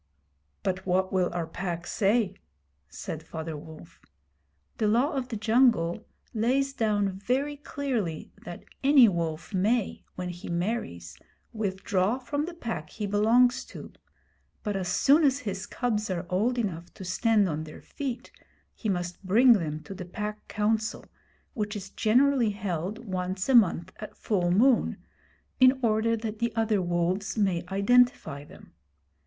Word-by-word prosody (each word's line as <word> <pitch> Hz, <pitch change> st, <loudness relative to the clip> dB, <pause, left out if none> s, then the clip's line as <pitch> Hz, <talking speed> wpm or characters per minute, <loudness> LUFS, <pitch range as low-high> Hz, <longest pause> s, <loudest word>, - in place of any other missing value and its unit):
'But 190 Hz, 0 st, -2 dB
what 185 Hz, +1 st, +1 dB
will 185 Hz, -2 st, +2 dB
our 175 Hz, -1 st, -2 dB
Pack 170 Hz, +1 st, -4 dB
say?' 205 Hz, 0 st, +1 dB, 0.6 s
said -, -, -6 dB
Father 160 Hz, 0 st, -6 dB
Wolf. 160 Hz, +2 st, -12 dB, 0.8 s
The 215 Hz, -, +2 dB
Law 240 Hz, +7 st, +3 dB
of 260 Hz, -2 st, -2 dB
the 240 Hz, -, -5 dB
Jungle 220 Hz, -4 st, +2 dB, 0.3 s
lays 260 Hz, +5 st, +1 dB
down 205 Hz, -5 st, 0 dB
very 270 Hz, +7 st, -1 dB
clearly 255 Hz, -, -3 dB
that -, -, -8 dB, 0.2 s
any 270 Hz, -3 st, +7 dB
wolf 170 Hz, -1 st, -2 dB
may, 210 Hz, +4 st, 0 dB
when 180 Hz, -1 st, -4 dB
he 175 Hz, 0 st, -8 dB
marries, 170 Hz, -, -3 dB, 0.3 s
withdraw 195 Hz, 0 st, 0 dB
from 275 Hz, +4 st, -3 dB
the 345 Hz, 0 st, -7 dB
Pack 225 Hz, -, -5 dB
he 210 Hz, -, -5 dB
belongs 225 Hz, +5 st, +3 dB
to; -, -, -10 dB, 0.7 s
but 210 Hz, -2 st, -2 dB
as 190 Hz, -2 st, -2 dB
soon 280 Hz, -, +4 dB
as 280 Hz, -1 st, +3 dB
his 195 Hz, -1 st, -4 dB
cubs 215 Hz, -4 st, -1 dB
are 180 Hz, -1 st, -2 dB
old 225 Hz, +7 st, +1 dB
enough 175 Hz, -7 st, -3 dB
to 190 Hz, -, -8 dB
stand 210 Hz, +2 st, +2 dB
on 155 Hz, -2 st, -3 dB
their 155 Hz, -, -12 dB
feet 255 Hz, -3 st, -5 dB, 0.4 s
he 220 Hz, -, -4 dB
must 175 Hz, 0 st, -3 dB
bring 235 Hz, +7 st, +6 dB
them 155 Hz, -6 st, -2 dB
to -, -, -8 dB
the 190 Hz, -, -7 dB
Pack 210 Hz, +3 st, -6 dB
Council, 220 Hz, +1 st, -1 dB, 0.5 s
which 210 Hz, -2 st, -3 dB
is 195 Hz, -1 st, -7 dB
generally 250 Hz, +1 st, +3 dB
held 200 Hz, +2 st, -4 dB
once 185 Hz, -1 st, -3 dB
a -, -, +4 dB
month 185 Hz, -6 st, +4 dB
at 215 Hz, -, -9 dB
full 180 Hz, -5 st, 0 dB
moon, 230 Hz, +7 st, +3 dB, 0.6 s
in 255 Hz, +1 st, +6 dB
order 225 Hz, 0 st, +2 dB
that 215 Hz, -1 st, -5 dB
the 235 Hz, 0 st, 0 dB
other 220 Hz, -3 st, +1 dB
wolves 175 Hz, +4 st, -1 dB
may 190 Hz, -5 st, +1 dB
identify 200 Hz, -7 st, +2 dB
them. -, -, -16 dB
210 Hz, 150 wpm, -27 LUFS, 180-235 Hz, 0.8 s, any